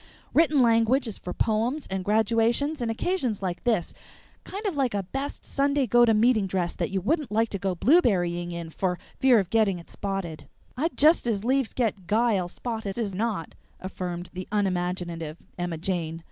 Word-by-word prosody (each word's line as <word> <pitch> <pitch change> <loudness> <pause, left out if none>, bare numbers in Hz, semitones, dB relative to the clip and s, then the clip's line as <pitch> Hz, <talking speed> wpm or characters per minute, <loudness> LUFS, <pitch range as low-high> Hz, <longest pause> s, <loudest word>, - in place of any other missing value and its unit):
"Written 305 -4 +4
language 230 +3 +3
is 215 - -6
for 180 - -6
poems 230 +9 0
and 190 -1 -3
graduations 230 +8 +2
and 235 - -1
occasions 235 - -1
like 180 -2 -3
this 220 -8 +1 0.5
kind 405 +3 -7
of 390 -6 -1
like 260 -6 0
a 200 - -1
best 270 +9 -5
Sunday 280 0 +1
go 240 +1 +5
to 225 - +4
meeting 220 -2 +3
dress 180 -2 -1
that - - -2
you 195 0 -1
wouldn't 290 - -1
like 225 +1 +2
to 200 - -4
go 190 -1 -1
blueberrying 175 - +2
in 170 -1 -6
for 180 +1 -1 0.2
fear 260 -3 +6
of 190 -4 0
getting 215 -5 +3
it 170 - -13
spotted." 195 -5 -4 0.3
"I'd 315 +7 -2
just 310 -3 +5
as 215 -2 -1
'lieves 265 -1 +1
get 205 -7 -1
'guile' 215 -3 +2
spotted 220 +1 -5
as 215 -5 -2
not," 205 -4 -2 0.3
affirmed 180 -2 -5
the 185 0 -6
unimaginative 180 -5 -2 0.2
Emma 175 -2 -3
Jane. 165 -2 -2
210 Hz, 180 wpm, -26 LUFS, 180-245 Hz, 0.5 s, fear